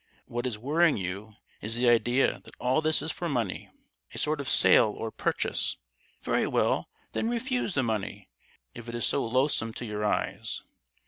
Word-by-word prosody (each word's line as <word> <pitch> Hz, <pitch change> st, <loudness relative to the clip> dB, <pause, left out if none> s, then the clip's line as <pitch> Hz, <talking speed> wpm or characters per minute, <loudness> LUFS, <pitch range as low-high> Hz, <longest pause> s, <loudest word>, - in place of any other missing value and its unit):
What 120 Hz, +2 st, -3 dB
is 115 Hz, -4 st, -3 dB
worrying 150 Hz, +7 st, +3 dB
you 100 Hz, +3 st, -5 dB, 0.3 s
is 110 Hz, +2 st, -1 dB
the 120 Hz, +1 st, +2 dB
idea 120 Hz, +2 st, +3 dB
that -, -, -13 dB
all 130 Hz, +5 st, +2 dB
this 155 Hz, 0 st, +2 dB
is 160 Hz, -, -2 dB
for 175 Hz, -, -4 dB
money—a 100 Hz, -, -5 dB
sort 155 Hz, 0 st, 0 dB
of 135 Hz, -, -4 dB
sale 105 Hz, -, +5 dB
or 115 Hz, -, -4 dB
purchase. -, -, 0 dB, 0.5 s
Very -, -, +1 dB
well, -, -, +1 dB, 0.2 s
then 225 Hz, -, -1 dB
refuse 240 Hz, -3 st, -1 dB
the 130 Hz, -, +2 dB
money, 105 Hz, -3 st, -3 dB, 0.5 s
if 120 Hz, 0 st, -9 dB
it 120 Hz, -, -5 dB
is 120 Hz, -, 0 dB
so -, -, +1 dB
loathsome 120 Hz, -2 st, +1 dB
to 120 Hz, -, -6 dB
your 105 Hz, -1 st, -3 dB
eyes. 105 Hz, -, -1 dB
120 Hz, 175 wpm, -28 LUFS, 110-150 Hz, 0.5 s, sale